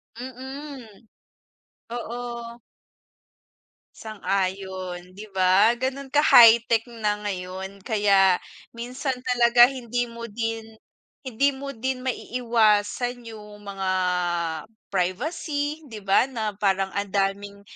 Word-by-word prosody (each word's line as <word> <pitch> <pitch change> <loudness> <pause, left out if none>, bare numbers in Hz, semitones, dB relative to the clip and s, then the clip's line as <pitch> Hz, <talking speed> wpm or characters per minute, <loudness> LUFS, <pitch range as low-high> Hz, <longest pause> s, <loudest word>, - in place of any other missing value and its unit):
Mm. 255 -3 -9 0.8
Oo. 235 0 -6 1.4
Sang-ayon, 190 -3 -3
di 205 +3 -10
ba 190 +5 +5
ganun 265 +2 -3
ka 295 +3 +2
high-tech 230 -1 +7 0.2
na 210 0 +1
ngayon. 190 +1 -6
Kaya 195 -4 +4 0.3
minsan 250 +2 -4
talaga 240 -1 +5
hindi 245 -2 -3
mo 235 0 -9
din 225 0 -3 0.6
hindi 270 +1 +1
mo 275 +1 -7
din 260 +1 -3
maiiwasan 240 -1 +1
yung 210 -1 -11
mga 195 -2 -4 1.0
privacy 290 - -2
di 220 -5 -9
ba, 195 +4 +3
na 220 -6 -4
parang 195 -2 +1
ang 200 0 -1
daming 200 +1 -1
225 Hz, 100 wpm, -24 LUFS, 200-250 Hz, 1.4 s, high-tech